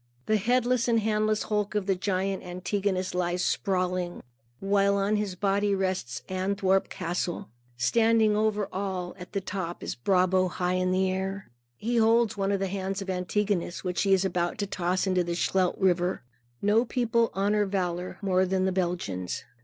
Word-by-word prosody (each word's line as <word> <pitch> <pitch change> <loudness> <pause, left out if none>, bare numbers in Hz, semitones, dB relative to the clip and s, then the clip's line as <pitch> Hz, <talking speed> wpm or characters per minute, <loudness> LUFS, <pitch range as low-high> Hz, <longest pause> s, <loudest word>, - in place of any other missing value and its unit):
The 215 - +3
headless 245 +3 +2
and 230 -1 +3
handless 215 0 +1
hulk 210 -1 -1
of 205 -2 0
the 195 - +2
giant 190 +1 -1
Antigonus 185 +1 -2
lies 180 0 0
sprawling, 180 -2 -1 0.4
while 200 0 +2
on 200 +2 +1
his 210 -3 -2
body 200 +1 +1
rests 185 -10 -2
Antwerp 190 +1 +1
castle. 175 +2 -3 0.3
Standing 220 - +3
over 210 -1 +1
all, 185 -2 -3
at 180 - -10
the 200 - -1
top, 185 -2 -5
is - - -3
Brabo 185 - +2
high 180 0 -1
in 185 0 +1
air. 190 0 -1 0.3
He 235 +2 -1
holds 230 0 +4
one 195 -1 0
of 200 - +1
the 195 - 0
hands 195 +1 -3
of 190 - -3
Antigonus, 185 0 -1
which 180 -2 -1
he 195 - +1
is 190 0 +4
about 175 -2 -1
to 205 - -1
toss 185 -1 -1
into 185 -2 +2
the 170 0 -3
Scheldt 185 0 +1
River. 180 -3 +1 0.4
No 210 +3 +4
people 235 -2 +1
honor 205 +1 +2
valor 180 -2 -2
more 185 -1 +2
than 190 0 +1
the 190 - +1
Belgians. 170 - -2
190 Hz, 170 wpm, -27 LUFS, 180-205 Hz, 0.4 s, holds